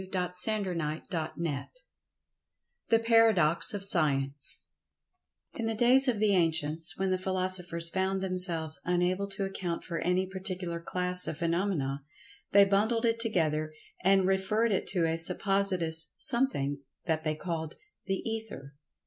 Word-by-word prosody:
[Pg 190 - -11
96] 180 -1 0
CHAPTER 170 -5 -3 0.2
VII 135 - -6 1.2
THE 230 - +5
PARADOX 225 -8 +3
OF 200 - -5
SCIENCE 140 -6 0 0.9
IN 230 - -4
the 225 - -1
days 255 +4 +5
of 245 -4 +1
the 205 -1 +2
ancients, 160 -2 0
when 190 0 -1
the 185 - 0
philosophers 185 -3 -1
found 190 0 -1
themselves 180 -4 +1
unable 180 +2 0
to 195 0 -1
account 185 -3 -4
for 170 -2 -4
any 180 +1 0
particular 185 -2 -2
class 180 +1 -1
of 150 - -4
phenomena, 170 -5 -1 0.5
they 200 0 +7
bundled 220 +4 +1
it 230 0 +1
together 155 -8 0 0.3
and 195 0 +4
referred 195 +4 +1
it 195 - -1
to 180 -4 +1
a 165 0 0
suppositious 175 -3 +2
Something 235 - +1 0.3
that 160 -2 -1
they 155 -1 -1
called 160 -1 -5 0.3
"The 195 +3 -2
Ether." 220 -11 -6
185 Hz, 140 wpm, -29 LUFS, 165-200 Hz, 1.2 s, they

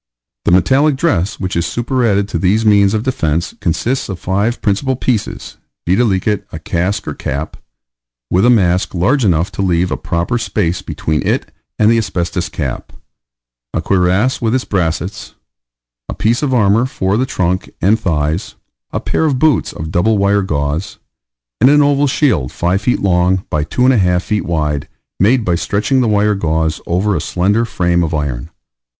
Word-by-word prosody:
The - - +2
metallic 135 +11 +3
dress 110 - 0
which 95 -1 -3
is 85 - +1
superadded 115 -1 0
to - - -2
these 105 +4 +1
means 100 -1 +4
of 110 - -1
defence 85 - -1
consists 120 +10 -1
of 95 - -4
five 100 +7 -1
principal 120 +6 0
pieces, 120 -4 -3 0.3
viz., 95 +1 +1 0.2
a - - -6
casque 90 +5 -2
or - - -2
cap, 70 +4 -4 0.8
with 90 +3 +3
a 120 - +5
mask 95 -6 +2
large 125 +11 +2
enough 85 -3 +1
to - - -4
leave 90 -1 +1
a - - -1
proper 85 +8 -2
space 90 -6 -1
between 80 -1 -2
it - - -1 0.3
and 110 +1 +4
the 115 - +3
asbestos 90 -3 -2
cap; 70 -6 -5 0.8
a - - +1
cuirass 95 +8 +1
with 115 +1 +1
its 130 - -1
brassets; 90 -1 -3 0.7
a - - -4
piece 110 +4 +1
of 145 -3 0
armour 115 0 +3
for 95 -6 -1
the 130 +4 0
trunk 90 -7 -1
and 105 +6 +2
thighs; 80 -1 -1 0.4
a - - -2
pair 160 - -1
of 140 -4 +1
boots 150 -2 +2
of 80 0 -7
double 105 +6 +2
wire 100 +1 +2
gauze; 75 -1 -2 0.6
and 125 - +5
an 150 0 +5
oval 145 0 +2
shield 130 - +1
5 90 +3 0
feet 125 +4 0
long 90 0 +2
by 75 -1 0
2 125 +10 -1
1/2 95 -9 +3
feet 105 -1 -2
wide, 75 -4 -1 0.3
made 115 +4 +3
by 90 - +1
stretching 105 +9 0
the 120 - +1
wire 105 0 +2
gauze 80 -4 -1
over 95 +4 +1
a 80 - -1
slender 100 +7 +1
frame 85 -5 0
of 80 0 -2
iron. 70 -6 -3
95 Hz, 170 wpm, -16 LUFS, 85-115 Hz, 0.8 s, a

